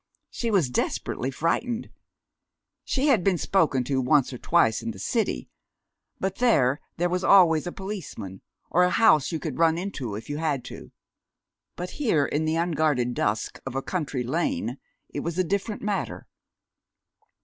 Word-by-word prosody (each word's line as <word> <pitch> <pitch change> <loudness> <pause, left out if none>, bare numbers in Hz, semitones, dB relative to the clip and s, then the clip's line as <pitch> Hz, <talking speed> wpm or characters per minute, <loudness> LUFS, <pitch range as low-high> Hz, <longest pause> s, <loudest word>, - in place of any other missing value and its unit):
She 235 - -2
was 180 - +2
desperately 125 +1 -1
frightened. 225 - -1 0.9
She 280 +2 0
had 225 -10 +4
been 190 -1 +2
spoken 155 -7 +2
to 130 +1 0
once 135 +1 +3
or 125 - -7
twice 115 -10 +2
in 115 - -4
the 110 - -6
city, 60 -8 -1 0.7
but 190 0 -2
there 145 - +3 0.2
there 175 - +2
was 180 +1 -1
always 175 -4 +5
a - - -3
policeman, 175 - -7 0.3
or 180 - +4
a 180 - +5
house 175 -8 +4
you 165 - -1
could 155 -3 -5
run 165 -1 +4
into 155 - -4
if 110 - -7
you 145 - -3
had 145 -6 -1
to. - - -10 0.8
But 180 +1 -5
here, 165 - +3
in 150 +3 -1
the 155 +1 +1
unguarded 155 -7 +1
dusk 105 -1 -1
of 135 -1 -6
a 135 - -1
country 145 -8 -2
lane, 130 -3 -1 0.3
it - - -5
was 170 +3 -4
a 185 - +3
different 200 +4 -2
matter. 205 -1 -2
160 Hz, 165 wpm, -26 LUFS, 130-185 Hz, 0.9 s, always